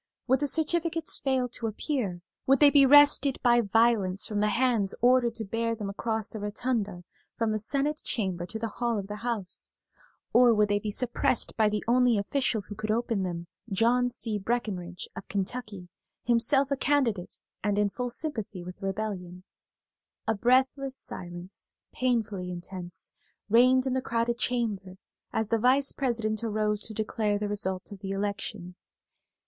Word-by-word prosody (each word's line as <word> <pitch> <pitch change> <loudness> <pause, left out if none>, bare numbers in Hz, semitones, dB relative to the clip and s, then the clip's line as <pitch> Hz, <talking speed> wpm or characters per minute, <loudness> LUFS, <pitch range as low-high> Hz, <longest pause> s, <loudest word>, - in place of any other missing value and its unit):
Would 260 0 +3
the 290 - 0
certificates 330 +2 +1
fail 260 -2 0
to 230 -1 -4
appear; 215 - -2 0.3
would 270 +1 +5
they 290 -1 +7
be 280 -2 +6
wrested 290 -1 +6
by 240 -1 +5
violence 210 -3 +2
from 210 -1 -2
the 210 0 +2
hands 230 -4 +1
ordered 245 -1 +3
to 225 -1 -5
bear 230 +3 -1
them 205 -3 -4
across 220 +1 -2
the 220 - -7
rotunda 205 -3 -2 0.3
from 225 -1 0
the 215 - -1
Senate 280 +7 -1
Chamber 185 -6 -2
to 220 - -6
the 225 +1 -2
hall 235 +1 -2
of 200 - -3
the 210 +1 -6
House, 225 -5 -3 0.6
or 240 -1 +6
would 210 -1 +3
they 205 0 +2
be 210 - -4
suppressed 240 +2 0
by 215 -2 +3
the 210 0 -2
only 245 -1 +4
official 225 +2 0
who 200 - -9
could 215 +1 -5
open 225 -2 0
them, 175 -2 -3 0.2
John 240 +5 +2
C. 225 -3 -1
Breckenridge 190 -5 -3
of - - -8
Kentucky, 200 -1 -4 0.4
himself 260 +4 +2
a - - +3
candidate 255 -10 0 0.3
and 205 0 +1
in 205 -1 +2
full 250 +2 -3
sympathy 225 - -3
with 180 +1 -9
the 195 - -4
rebellion. 190 -3 -4 0.8
A 225 - +3
breathless 260 +4 +1
silence, 175 +1 -8 0.2
painfully 220 -7 -1
intense, 175 -1 -7 0.4
reigned 255 +3 +5
in 260 - 0
the 260 - 0
crowded 235 -1 -1
chamber 205 -7 -2 0.3
as 220 -1 -1
the 230 0 +2
Vice 265 +4 +3
President 225 -5 -1
arose 210 -1 0
to 220 - -5
declare 215 -1 0
the 210 0 -2
result 190 -2 -3
of 200 - -9
the 195 0 -6
election. 195 -2 -3
220 Hz, 165 wpm, -28 LUFS, 200-250 Hz, 0.8 s, they